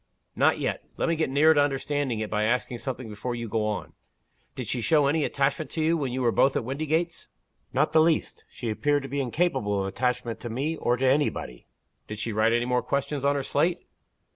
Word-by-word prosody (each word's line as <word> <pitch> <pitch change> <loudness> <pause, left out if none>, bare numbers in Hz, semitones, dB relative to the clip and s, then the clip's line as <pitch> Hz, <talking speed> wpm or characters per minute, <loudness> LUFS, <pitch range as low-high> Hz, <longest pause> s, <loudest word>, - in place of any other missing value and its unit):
"Not - - +3
yet. - - -2 0.2
Let - - 0
me 165 - +2
get 160 -3 0
nearer 150 +4 +5
to 145 - +4
understanding 140 -4 -1
it 110 - -3
by 105 0 +1
asking 120 +1 0
something 130 -2 -5
before 110 +3 -4
you 120 -1 -4
go 110 0 0
on. 105 -3 -4 0.6
Did - - -5
she 125 - -1
show 150 +4 +3
any 150 +2 +2
attachment 140 +2 0
to 160 - -2
you, 165 +2 +3
when 140 -6 -2
you 130 +1 -2
were 120 - +3
both 135 +3 +3
at - - 0
Windygates?" 155 +6 -2 0.4
"Not - - +1
the 160 0 +5
least. 160 0 +1
She 115 -3 -4
appeared 145 +5 +1
to 135 - -7
be 140 +1 -1
incapable 125 - 0
of - - -2
attachment 120 +2 -2
to 120 - -6
me, 140 +8 -2
or 120 -5 0
to 135 - 0
any 140 +3 +4
body." 60 - -8 0.4
"Did 105 - -6
she 110 +2 -3
write 110 +2 +3
any 120 +1 +2
more 125 0 +1
questions 140 0 -2
on 140 0 +3
her 140 - -1
slate?" 165 +6 0
135 Hz, 225 wpm, -26 LUFS, 115-145 Hz, 0.6 s, nearer